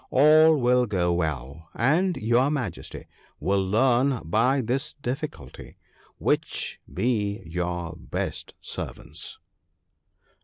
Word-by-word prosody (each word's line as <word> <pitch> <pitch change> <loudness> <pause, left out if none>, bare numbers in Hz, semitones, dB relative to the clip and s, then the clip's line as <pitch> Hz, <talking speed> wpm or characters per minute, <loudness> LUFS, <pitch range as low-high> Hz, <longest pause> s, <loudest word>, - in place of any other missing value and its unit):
All 155 +3 +6
will 125 0 +3
go 90 -4 +1
well, 80 -2 -3
and 165 - +2
your 120 +5 +2
Majesty 125 - -4 0.3
will 95 +5 +1
learn 125 +5 +2
by 120 - +2
this 130 +5 -1
difficulty 140 - -6 0.4
which - - -1
be 105 -4 -1
your 85 0 -3
best - - -4
servants.' - - -6
115 Hz, 100 wpm, -26 LUFS, 90-135 Hz, 0.4 s, All